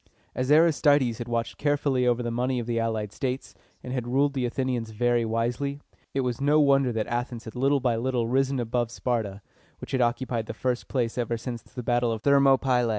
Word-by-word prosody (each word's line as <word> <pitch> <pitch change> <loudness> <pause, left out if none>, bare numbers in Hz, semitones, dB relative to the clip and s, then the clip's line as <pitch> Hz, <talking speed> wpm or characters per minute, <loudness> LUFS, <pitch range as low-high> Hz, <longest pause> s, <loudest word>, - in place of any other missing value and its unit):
As 130 +1 -2
Aristides 145 -6 +4
had 120 - -5
watched 115 -1 -2
carefully 140 -3 +1
over 120 0 +2
the 120 - -2
money 125 +2 0
of 120 - -2
the 115 0 -1
allied 110 -2 -2
states, 130 0 -3 0.3
and 125 - -5
had 125 -2 -3
ruled 140 +3 +2
the 130 -3 0
Athenians 125 -2 -2
very 120 +2 +1
wisely, 120 +5 -1 0.4
it 135 - +2
is 125 +1 -2
no 145 +2 +4
wonder 140 -3 +4
that 110 -2 -1
Athens 120 0 -3
had 110 - -8
little 135 +3 +2
by 125 -3 +1
little 120 -1 0
risen 135 +2 +1
above 120 0 -1
Sparta, 110 -5 -3 0.4
which - - -9
had 130 - +1
occupied 120 -1 -1
the - - -6
first 125 -2 -2
place 120 -2 -1
ever 115 -1 -1
since 120 0 -6
the 125 - -9
battle 120 0 +1
of 110 -1 -4
Thermopylæ. 135 -3 +4
125 Hz, 205 wpm, -26 LUFS, 115-135 Hz, 0.4 s, Aristides